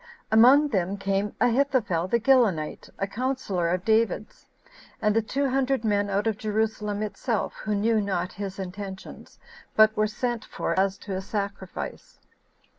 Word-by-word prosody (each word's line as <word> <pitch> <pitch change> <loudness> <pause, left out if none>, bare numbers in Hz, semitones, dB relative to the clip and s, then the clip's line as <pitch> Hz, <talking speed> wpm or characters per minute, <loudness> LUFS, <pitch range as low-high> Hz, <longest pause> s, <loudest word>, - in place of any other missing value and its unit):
2. 220 - +5
Among 275 +6 +7
them 195 -3 -1
came 195 +1 -1
Ahithophel 240 -8 +2
the 235 +5 +2
Gilonite, 220 - +2
a 195 - -1
counsellor 205 -5 -2
of 180 +2 -1
David's, 220 -1 0 0.5
and 220 0 +1
two 280 +1 +1
hundred 265 -2 0
men 205 -1 +1
out 200 +2 0
of 220 -2 -1
Jerusalem 215 -1 -1
itself, 215 +2 -2
who 210 -1 -3
knew 220 +2 +2
not 185 -2 -2
his 195 -1 -6
intentions, 190 0 -8 0.4
but 215 0 +6
were 215 0 +2
sent 235 +1 -3
for - - -3
as 195 0 +1
to 200 - -7
a 190 - -2
sacrifice. 200 -1 -5
210 Hz, 150 wpm, -26 LUFS, 195-230 Hz, 0.5 s, Among